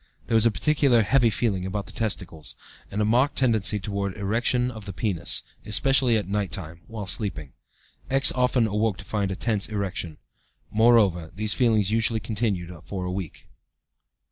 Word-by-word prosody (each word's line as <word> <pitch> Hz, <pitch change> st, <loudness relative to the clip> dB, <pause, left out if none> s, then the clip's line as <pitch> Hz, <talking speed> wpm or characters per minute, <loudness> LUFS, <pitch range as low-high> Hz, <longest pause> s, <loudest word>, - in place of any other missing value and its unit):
There -, -, -4 dB
was 115 Hz, 0 st, +5 dB
a -, -, +2 dB
peculiar 140 Hz, -3 st, +2 dB
'heavy' 125 Hz, +1 st, +3 dB
feeling 105 Hz, -4 st, -1 dB
about 100 Hz, +2 st, -4 dB
the -, -, -11 dB
testicles, 90 Hz, -8 st, -4 dB, 0.3 s
and 105 Hz, +2 st, -1 dB
a -, -, +1 dB
marked 125 Hz, +6 st, +2 dB
tendency 110 Hz, -5 st, +1 dB
towards 100 Hz, -1 st, -4 dB
erection 120 Hz, +5 st, 0 dB
of 110 Hz, -3 st, -10 dB
the 100 Hz, -, -5 dB
penis, 90 Hz, -2 st, 0 dB, 0.2 s
especially 130 Hz, +1 st, +3 dB
at 105 Hz, -4 st, -3 dB
night 100 Hz, -2 st, -2 dB
time 85 Hz, 0 st, -5 dB
(while 110 Hz, -3 st, -6 dB
sleeping). 95 Hz, -, -1 dB, 0.6 s
X. 135 Hz, 0 st, +5 dB
often 125 Hz, -2 st, +2 dB
awoke 105 Hz, -1 st, 0 dB
to 95 Hz, -, -10 dB
find 100 Hz, -2 st, -2 dB
a 95 Hz, -, -3 dB
tense 105 Hz, 0 st, -1 dB
erection. 95 Hz, -6 st, -4 dB, 0.5 s
Moreover, 105 Hz, -7 st, +3 dB
these 105 Hz, +1 st, +3 dB
feelings 110 Hz, -5 st, +2 dB
usually 115 Hz, 0 st, +1 dB
continued 105 Hz, -6 st, -2 dB
a 90 Hz, +2 st, -6 dB
week. 95 Hz, -3 st, -6 dB
105 Hz, 165 wpm, -25 LUFS, 95-115 Hz, 0.6 s, was